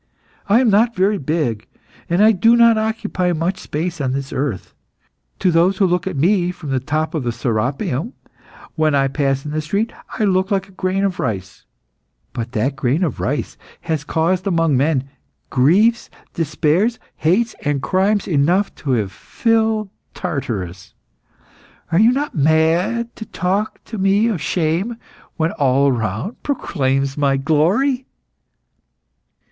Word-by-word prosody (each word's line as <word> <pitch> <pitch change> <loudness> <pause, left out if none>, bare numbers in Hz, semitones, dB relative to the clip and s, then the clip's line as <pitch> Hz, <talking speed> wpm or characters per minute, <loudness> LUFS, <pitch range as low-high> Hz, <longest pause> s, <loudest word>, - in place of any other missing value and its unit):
I 215 +4 +5
am 240 -4 +3
not 230 +4 +3
very 195 +2 +2
big, 140 -7 -2 0.4
and 175 +4 +3
I 220 - +7
do 225 +4 +4
not 235 -1 +6
occupy 215 -5 -1
much 175 +4 -1
space 165 +1 -4
on 130 -2 -1
the 140 +1 -4
earth. 130 -8 -3 0.6
To 185 - +2
those 175 +4 +3
who 195 - +3
look 180 0 0
at 190 - -3
me 175 +4 +2
from 160 -5 -6
the 130 - +1
top 155 +5 -2
of 160 - -1
the 120 -2 -1
Serapeium, 125 - -2 0.6
when 155 -2 +1
I 135 -1 +3
pass 135 -1 -1
in 150 - -4
the 155 +1 -1
street, 200 +9 -2 0.2
I - - 0
look 190 -1 +2
like 195 -1 0
a - - -18
grain 185 +1 -1
of 190 -3 -1
rice; 95 - -4 0.7
but 120 +1 -5
that 130 +6 0
grain 135 +6 0
of 155 -8 -2
rice - - -2 0.2
has 155 -3 -2
caused 170 +5 0
among 165 -5 +2
men, 135 0 +1 0.4
griefs, 195 - +3 0.2
despairs, 165 +8 +1 0.2
hates, 210 +9 +1
and 145 -1 0
crimes 195 +5 +1
enough 175 +5 +2
to 135 -3 -2
have 105 -5 0
filled 220 - 0 0.2
Tartarus. 100 - -4 1.0
Are 165 - +3
you 225 +3 +6
not 285 +3 -2
mad 165 +10 +1
to - - -6
talk 200 +1 -2
to 220 - -7
me 200 +4 +3
of 190 -9 -2
shame 180 +7 -1 0.4
when 165 0 +1
all 140 0 +2
around 115 - -3
proclaims 135 - -1
my 140 -1 +2
glory?" 190 - +1
165 Hz, 150 wpm, -19 LUFS, 140-200 Hz, 1.0 s, I